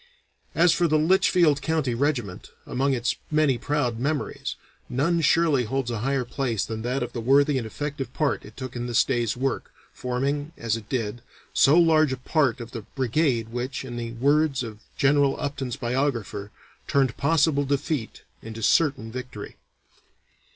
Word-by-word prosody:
As 170 0 +5
for 175 - +2
the 155 -1 +3
Litchfield 165 -2 +3
County 155 -6 0
regiment, 120 -7 -2 0.2
among 135 +2 0
its 120 0 -1
many 150 -5 +2
proud 145 -6 -1
memories, 145 +3 -2 0.3
none 165 +7 +1
surely 155 -5 +3
holds 130 +1 -2
a 115 - -2
higher 135 +2 0
place 120 -5 -1
than 110 -1 -5
that 125 +4 -1
of - - -6
the 120 - -3
worthy 140 +3 +4
and 115 - -5
effective 140 +1 -5
part 150 0 -1
it 105 +1 -14
took 130 -2 -6
in 120 0 -3
this 120 -2 +3
day's 120 -3 -1
work, 135 0 -2 0.2
forming, 140 +5 -2
as 115 -2 -1
it 110 -2 -9
did, 120 -3 -2 0.3
so 145 +5 +5
large 160 -4 +5
a 130 - -2
part 130 -1 +1
of 120 -1 -8
the 115 - -6
brigade 120 +1 0
which, 125 +3 -4
in 120 -2 -7
the 115 -1 -4
words 140 +2 +2
of 110 -3 -8 0.2
General 140 0 +3
Upton's 140 -4 -3
biographer, 120 -6 -2 0.4
turned 135 -4 +2
possible 150 -1 +2
defeat 140 -2 -2 0.2
into 115 0 -8
certain 135 -5 +2
victory. 125 -4 -7
135 Hz, 165 wpm, -25 LUFS, 120-145 Hz, 0.4 s, As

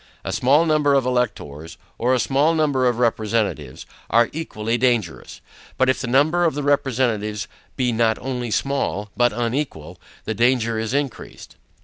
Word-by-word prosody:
A - - -4
small 145 +6 +3
number 150 -3 +2
of 135 -2 +2
electors, 100 - -3 0.2
or 125 +2 +2
a - - 0
small 145 +6 +2
number 145 -5 +2
of 120 -2 0
representatives, 110 - -1 0.2
are 115 +1 +3
equally 115 -8 -3
dangerous. 120 -8 -1 0.4
But 130 0 +3
if 130 - +1
the 135 - -3
number 150 +8 +3
of 165 -4 +1
the 145 - -3
representatives 120 -7 0 0.3
be 125 -2 0
not 115 -1 +1
only 125 -2 -4
small, 110 -5 -2
but 120 0 +3
unequal, 120 - -4 0.2
the 110 - -2
danger 115 0 +1
is 115 +4 -2
increased. 140 - -5
125 Hz, 155 wpm, -21 LUFS, 110-140 Hz, 0.4 s, small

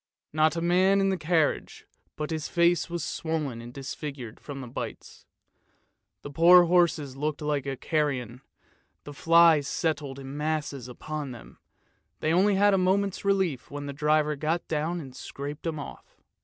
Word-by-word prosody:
Not 155 0 +3
a 165 - -2
man 185 +3 +3
in 195 0 +2
the 190 - +1
carriage 160 -3 0 0.3
but 150 +1 -4
his 155 -2 -3
face 170 -1 +2
was 170 -2 -3
swollen 150 -9 -3
and 120 +1 -9
disfigured 135 -3 -7
from 140 -2 -8
the 130 - -7
bites. 120 - -8 1.0
The 145 - -7
poor 175 +4 +7
horses 170 -6 +2
looked 150 +2 -2
like 145 -2 -1
carrion, 130 -6 -1 0.6
the 145 - -9
flies 165 -1 +5
settled 145 -4 -2
in 135 0 -8
masses 150 -4 -3
upon 145 +2 -6
them; 120 - -13 0.6
they 155 - 0
only 195 +3 +4
had 205 +1 +4
a 195 - +3
moment's 195 +1 +1
relief, 190 -9 0
when 145 0 -6
the 140 - -5
driver 150 +1 +1
got 160 +4 -2
down 160 +3 -1
and 135 -5 -10
scraped 140 +2 -7
them 160 -2 -2
off. 145 - -10
155 Hz, 160 wpm, -27 LUFS, 140-170 Hz, 1.0 s, poor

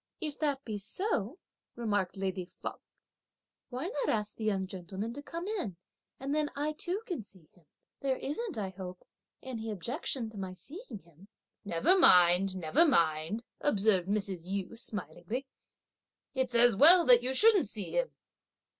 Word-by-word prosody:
"If 305 -4 -5
that 285 -3 -1
be 215 -3 -4
so," 235 - -2 0.4
remarked 205 -6 -1
lady 190 -1 -3
Feng, - - -8 0.9
"why 255 +4 -4
not 475 +4 -2
ask 210 -1 -1
the 225 - -7
young 195 -3 0
gentleman 190 +4 -6
to 285 - -7
come 335 +5 -6
in, 355 - -3 0.4
and 275 +2 -3
then 300 -1 0
I 295 +2 -1
too 365 +7 -3
can 350 - -4
see 185 -6 -17
him. 170 -4 -26 0.3
There 265 -1 -1
isn't, 355 - -4
I 200 -3 -2
hope, 185 -1 -9 0.4
any 230 -4 -5
objection 230 - -4
to 210 - -9
my 185 -1 -5
seeing 300 - -10
him?" 170 +3 -19 0.4
"Never 200 - +2
mind! 180 - +6
never 165 - +3
mind!" 170 - +1
observed 200 -8 +2
Mrs. 195 -4 -2
Yu, 195 +3 -4
smilingly; 230 +3 -5 0.9
"it's 260 -3 -1
as 240 -2 +5
well 335 - +8
that 245 -1 +8
you 255 +1 0
shouldn't 395 - +6
see 205 -3 -6
him. - - 0
220 Hz, 155 wpm, -31 LUFS, 190-290 Hz, 0.9 s, well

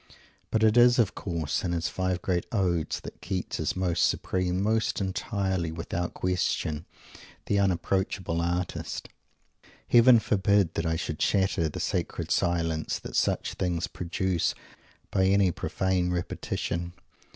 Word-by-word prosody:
But 110 0 +1
it 110 +1 +4
is, 120 0 +7
of 115 -6 +3
course, 85 -6 -2
in 85 - -1
his 85 -1 0
five 95 -1 -2
great 90 -2 0
Odes, 90 -7 0
that - - -10
Keats 95 0 -3
is - - -1
most 90 -2 0
supreme, 90 0 0
most 110 +2 +1
entirely, 95 -3 -1
without 85 +1 -4
question, 85 -4 -1 0.6
the 100 - +1
unapproachable 95 -2 0
artist. 90 +1 -3 0.8
Heaven 120 0 +7
forbid 100 -3 +2
that 80 - -1
I 80 - +1
should 80 -2 -4
shatter 95 -5 +2
the - - -6
sacred - - -2
silence 85 -2 0
that - - -8
such - - +1
things 90 -2 -1
produce, 90 0 -1 0.6
by 95 - +2
any 100 -1 +4
profane 95 +1 -1
repetition! 85 -1 -3
90 Hz, 135 wpm, -28 LUFS, 85-95 Hz, 0.8 s, is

